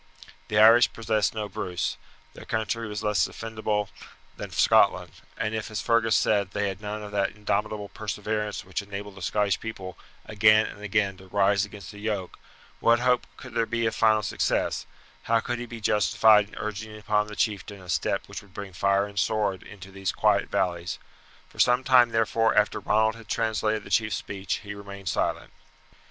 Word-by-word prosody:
The 105 - -1
Irish 115 +3 +7
possessed 110 -2 0
no 105 -1 -3
Bruce; 90 -2 -3 0.4
their - - -12
country 110 +1 -2
was 105 0 -5
less 105 -1 +2
defendible 110 -2 -2 0.5
than - - -7
Scotland; - - +3 0.3
and 110 0 -2
if, 110 0 -3
as 110 - -4
Fergus 115 -1 +2
said, 100 -3 +1
they 105 -1 0
had 95 +1 -7
none 105 0 -5
of 105 - -8
that 100 +1 0
indomitable 105 0 -2
perseverance 105 +1 -3
which 95 +2 -3
enabled 100 0 -7
the 100 - -13
Scotch 100 0 0
people 95 -5 -7 0.3
again 110 +1 +5
and 105 - -9
again 100 -2 0
to 95 0 -15
rise 100 +1 +2
against 100 -3 -10
the 100 - -12
yoke, 105 -4 -4 0.4
what 115 0 +4
hope 125 0 +2
could 130 -3 -11
there 115 -1 +1
be 115 -1 -1
of 110 - 0
final 110 -1 +3
success, - - -1 0.4
how 115 0 +4
could 120 +1 -3
he 120 - -6
be 115 0 -8
justified 105 0 +4
in - - -14
urging 110 0 -5
upon 105 0 0
the 105 - -8
chieftain 100 -2 -2
a 90 - -14
step 85 - -1
which - - -7
would 100 -2 -21
bring 100 -2 -7
fire 100 +3 +2
and 100 -1 -5
sword 105 -4 0
into 95 -2 -12
those 95 0 -2
quiet 105 -2 +2
valleys! 85 -1 -1 0.5
For - - -18
some 125 +1 +4
time, 125 -2 +6
therefore, 115 0 +1
after 105 - +2
Ronald 110 +1 +1
had 115 - -14
translated 110 -1 0
the 100 - -11
chief's 110 +2 +2
speech 100 -1 -4
he 105 0 -6
remained 100 -2 -7
silent. - - -2
105 Hz, 185 wpm, -26 LUFS, 100-110 Hz, 0.5 s, Irish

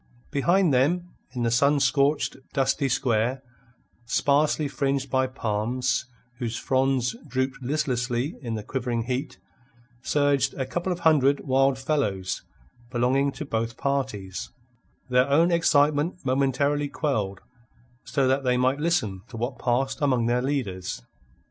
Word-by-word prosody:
Behind 170 +3 +3
them 170 +8 +2 0.3
in 120 - -1
the 115 - +1
sun 140 +4 +3
scorched, 140 +1 +2 0.2
dusty 135 0 +1
square, 120 +1 0 0.6
sparsely 145 +4 +2
fringed 140 -1 -1
by 130 0 +2
palms, 125 +1 -1 0.3
whose 120 -2 -3
fronds 130 -2 +1
drooped 130 +1 -2
listlessly 125 -1 -1
in 115 -4 -3
the 105 - -5
quivering 120 -1 -2
heat, 130 +3 -3 0.6
surged 140 -1 +1
a 135 - -2
couple 175 +7 -2
of 175 -1 -3
hundred 145 -4 +4
wild 135 0 +2
fellows 105 -10 -1 0.5
belonging 130 +3 +1
to 150 - -6
both 115 -2 -2
parties, 130 -10 -2 0.6
their 125 +1 +3
own 165 +5 +4
excitement 150 -1 +3
momentarily 140 +2 +1
quelled 105 -11 -2 0.6
so 135 -2 0
that 135 +1 +1
they 125 -1 +2
might 130 +3 +2
listen 145 - 0
to 130 -4 -9
what 120 +3 -3
passed 130 +4 0
among 130 -5 +2
their 120 +1 +1
leaders. 100 - -3
130 Hz, 130 wpm, -25 LUFS, 120-145 Hz, 0.6 s, hundred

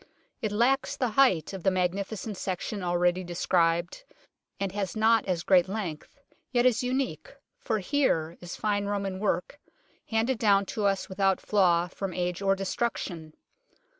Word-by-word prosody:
It 215 - -1
lacks 270 +6 +1
the 250 -3 0
height 220 - +3
of 190 - -6
the 190 - +3
magnificent 195 +3 -2
section 190 +3 -4
already 175 +1 +1
described, 170 - 0 0.6
and 195 -1 -1
has 195 0 -3
not 220 0 +3
as 175 -3 -1
great 185 -2 +4
length, 190 - -5 0.3
yet 245 -1 +2
is 240 -3 +3
unique, 250 - -2 0.3
for 225 -4 -1
here 185 - 0
is 175 0 -7
fine 205 -1 -1
Roman 200 -2 -2
work, 200 +6 -1 0.5
handed 225 +2 +1
down 200 -2 +4
to 210 - -1
us 195 -1 0
without 195 0 +1
flaw 175 -4 +2
from 185 0 -5
age 180 +1 -2
or 195 0 +3
destruction. 190 -5 -3
195 Hz, 150 wpm, -28 LUFS, 180-220 Hz, 0.6 s, great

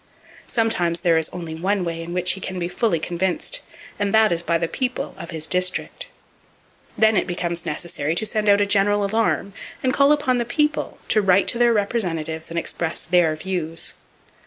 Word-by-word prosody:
Sometimes 175 -8 0
there 170 -2 +3
is 160 - -1
only 170 -3 -6
one 185 +3 -1
way 165 -1 -3
in 165 +1 -7
which 180 0 +2
he 190 - -5
can 185 0 -4
be 175 -1 -2
fully 200 0 0
convinced; 180 - -1 0.4
and 205 -1 0
that 220 -2 +5
is 170 -1 +1
by 170 -1 +1
the 165 0 -1
people 255 +6 -3
of 170 - -8
his 160 -3 -4
district. 180 - -1 0.9
Then 220 0 +4
it - - +1
becomes 175 -1 -3
necessary 155 -1 -2
to 220 - +1
send 215 -1 +1
out 200 0 +5
a - - +3
general 205 0 +2
alarm, 210 -1 0 0.3
and 255 -1 +2
call 280 +1 +4
upon 290 -4 +2
the - - +1
People 300 +5 -1
to 215 - +4
write 195 0 +3
to 235 - +1
their 240 -1 +5
representatives 170 -7 -1
and 170 - -5
express 165 0 0
their 170 -2 +3
views. 165 -1 -3
185 Hz, 190 wpm, -22 LUFS, 170-220 Hz, 0.9 s, that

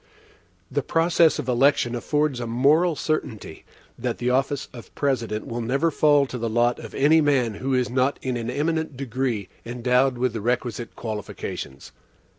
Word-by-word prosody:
The - - 0
process 165 0 +3
of 150 -5 -4
election 125 -1 +3
affords 145 +2 0
a 120 - -4
moral 150 +9 +3
certainty, 125 - -4 0.3
that 120 -1 -2
the 125 +1 0
office 135 +2 0
of 120 -2 -12
President 115 -6 -1
will 120 +1 -4
never 135 +8 +1
fall 145 -1 +4
to 125 -2 -6
the 115 0 -2
lot 120 +2 +2
of 110 - -9
any 155 +4 +5
man 135 -6 +2
who 135 0 0
is 125 -1 +1
not 130 +2 +1
in 130 -1 -1
an 115 -1 -3
eminent 155 +1 -1
degree 125 -6 -2 0.2
endowed 125 +2 +1
with 125 -1 0
the 110 - -4
requisite 120 0 -2
qualifications. 105 - -6
125 Hz, 165 wpm, -24 LUFS, 120-145 Hz, 0.3 s, any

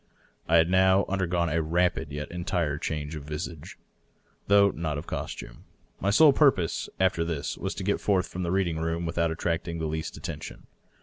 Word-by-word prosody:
I 85 - +3
had 80 0 +5
now 95 +1 +4
under 95 -1 -1
gone 85 -1 0
a 80 +2 +1
rapid 85 -2 0
yet 75 +1 -5
entire 85 -4 -1
change 75 -1 -3
of 75 - -6
visage, 75 +2 -6 0.7
though 100 0 +5
not 80 -3 -3
of 75 - -6
costume. - - -6 0.3
My 95 - 0
sole 145 +8 +7
purpose, 130 - +2
after 95 -3 +2
this, 80 -4 -3
was - - -4
to 95 - -5
get 100 +2 0
forth 95 -3 +1
from 90 - -6
the 85 - -1
reading 90 -4 0
room 80 +1 -2
with 85 +1 -3
out 85 0 +3
attracting 85 +1 -2
the 80 - -3
least 80 0 -4
attention. - - -7
85 Hz, 190 wpm, -27 LUFS, 80-95 Hz, 0.7 s, sole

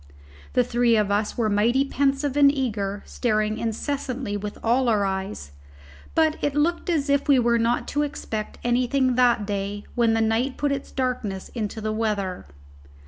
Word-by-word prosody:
The 250 - +4
three 240 -1 +2
of 210 -1 +1
us 210 +1 0
were 230 -2 +1
mighty 230 +6 +2
pensive 275 0 0
and 285 -1 +6
eager, 210 -7 -2
staring 215 -2 -1
incessantly 250 0 -3
with 205 0 -5
all 245 +2 +2
our 210 -3 +2
eyes; 190 - -4 0.6
but 315 -1 +3
it 290 -1 0
looked 335 +4 0
as 305 -4 +1
if 280 0 +1
we 280 -2 +5
were 235 -1 +3
not 235 +1 0
to 290 - 0
expect 225 -7 -4
anything 250 +2 +2
that 240 -4 +3
day 200 0 -3
when 230 -2 +2
the - - +1
night 225 +4 0
put 290 -1 0
its 275 -1 -4
darkness 245 -7 -3
into 220 -1 -4
the 215 0 -2
weather. 205 - -2
235 Hz, 170 wpm, -24 LUFS, 210-270 Hz, 0.6 s, and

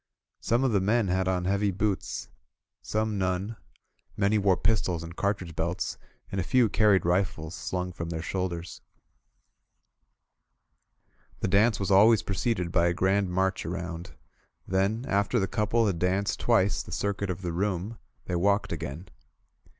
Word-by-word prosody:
Some 120 +3 +1
of 130 - +2
the 100 -3 +2
men 105 +1 +2
had 95 +1 +1
on 90 -1 0
heavy 100 +2 +1
boots, 100 +1 -2 0.5
some 110 -1 -1
none; 95 +4 -1 0.6
many 105 +2 +2
wore 95 -2 +3
pis 110 -4 +2
tols 85 -3 -2
and 85 0 -9
cartridge 95 -5 -2
belts, 85 +2 -2 0.3
and 95 - -1
a - - -1
few 120 +4 +3
carried 105 -4 +3
rifles 85 -3 0
slung 90 0 -3
from 85 -1 -6
their 80 -1 -4
shoulders. 90 -3 -4 2.6
The - - +1
dance 100 +2 +3
was 100 0 -1
always 110 +3 +6
preceded 95 -3 -1
by 85 -1 +3
a 85 - 0
grand 95 +2 +2
march 95 +1 0
around; 85 0 -5 0.5
then, 100 +6 0
after 100 +3 +1
the 100 - +2
couple 110 +4 +1
had 95 -5 0
danced 95 +3 0
twice 105 -4 +2
the - - -11
circuit 100 -1 -2
of 90 +1 -4
the 85 -2 -2
room, 100 +4 -2 0.3
they 90 - -2
walked 100 +2 +1
again. 80 +1 -5
95 Hz, 155 wpm, -28 LUFS, 90-105 Hz, 2.6 s, always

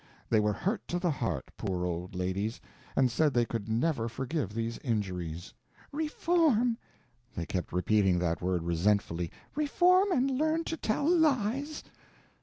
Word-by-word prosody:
They 110 - +5
were 105 0 +2
hurt 200 - -2
to 175 - -1
the 175 -1 +1
heart, 95 - -3
poor 90 -2 -2
old 90 +1 -4
ladies, 95 +5 -2 0.4
and 130 -2 +3
said 150 +2 +2
they 120 -1 +4
could 115 -2 -4
never 115 0 +1
forgive 130 - -3
these 115 0 -2
injuries. 90 - -3 0.4
"Reform!" 300 -5 +2 0.6
They 85 - -3
kept 90 +1 -3
repeating 95 +1 +3
that 85 -2 0
word 90 -1 0
resentfully. 85 0 +1 0.2
"Reform 360 +7 +4
and 270 -5 +2
learn 315 +5 +1
to 325 - -3
tell 285 0 0
lies!" 290 -3 +2
115 Hz, 145 wpm, -30 LUFS, -, 0.6 s, They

